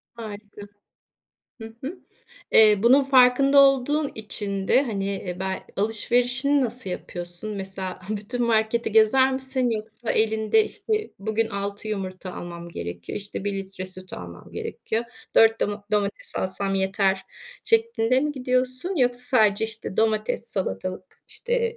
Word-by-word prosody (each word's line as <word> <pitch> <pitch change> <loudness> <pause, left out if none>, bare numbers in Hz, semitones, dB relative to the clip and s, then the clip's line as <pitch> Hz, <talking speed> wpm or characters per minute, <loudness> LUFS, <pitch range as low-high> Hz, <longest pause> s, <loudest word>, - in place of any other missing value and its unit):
Harika. 210 -2 -9 1.0
Hı 225 0 -9
hı. 335 +7 -5 0.5
Eee, 215 -1 +7
bunun 260 +4 +6
farkında 270 +1 +5
olduğun 275 +2 +2
için 200 -2 -2
de, 265 - +5
hani 195 -6 -3
bel 190 0 -2
alışverişini 245 +6 +2
nasıl 240 -5 -5
yapıyorsun? 175 +3 -6
Mesela 190 -1 -6
bütün 215 +4 -2
marketi 220 0 +1
gezer 260 +5 +5
misin, 260 -1 -1
yoksa 220 +1 -4
elinde 220 - +3
işte 430 0 -2
bugün 220 +2 -1
6 200 +1 -4
yumurta 185 -3 -5
almam 170 0 -7
gerekiyor, 85 - -6
işte 200 -1 -4
1 205 - -1
litre 195 -1 -6
süt 185 0 -10
almam 85 -1 -9
gerekiyor, 225 +2 -3 0.3
4 225 0 +5
doma 205 0 -2
domates 205 -1 -1
alsam 195 +1 -2
yeter 190 0 +1 0.4
şeklinde 445 - +2
mi 300 +1 -1
gidiyorsun, 255 +6 -1
yoksa 245 -2 +2
sadece, 220 -5 +3
işte, 220 -3 -2
domates, 220 +1 0
salatalık, 185 - -4
işte, 470 -1 -1
220 Hz, 130 wpm, -24 LUFS, 195-255 Hz, 1.0 s, Eee